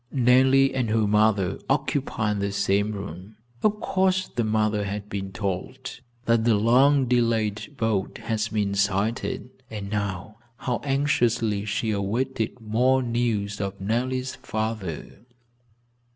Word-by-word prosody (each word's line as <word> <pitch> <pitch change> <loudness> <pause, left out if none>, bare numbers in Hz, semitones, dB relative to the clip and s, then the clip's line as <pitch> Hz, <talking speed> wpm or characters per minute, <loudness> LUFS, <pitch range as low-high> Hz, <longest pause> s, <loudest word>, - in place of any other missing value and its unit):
Nellie 130 +1 +4
and 125 -4 0
her 110 0 +2
mother 105 -2 +2
occupied 135 -6 0
the 100 0 -1
same 100 +1 +1
room. 100 0 -8 0.3
Of 210 0 +2
course 185 0 +1
the 120 - -1
mother 105 -1 +1
had 105 +1 -5
been 95 -1 -4
told 100 +7 -4 0.3
that 115 -1 +3
the 115 -1 +4
long 130 +6 +4
delayed 115 +1 0
boat 110 -4 -1
had 110 -1 -2
been 105 -2 0
sighted, 100 +5 -1 0.2
and 105 -2 -6
now, 100 0 -3 0.2
how 125 -2 -2
anxiously 120 -7 +1
she 110 +1 -1
awaited 115 +4 -2
more 125 +4 +2
news 115 -4 -1
of 100 0 -4
Nellie's 125 +6 -1
father. 110 -6 -4
110 Hz, 125 wpm, -25 LUFS, 100-125 Hz, 0.3 s, Nellie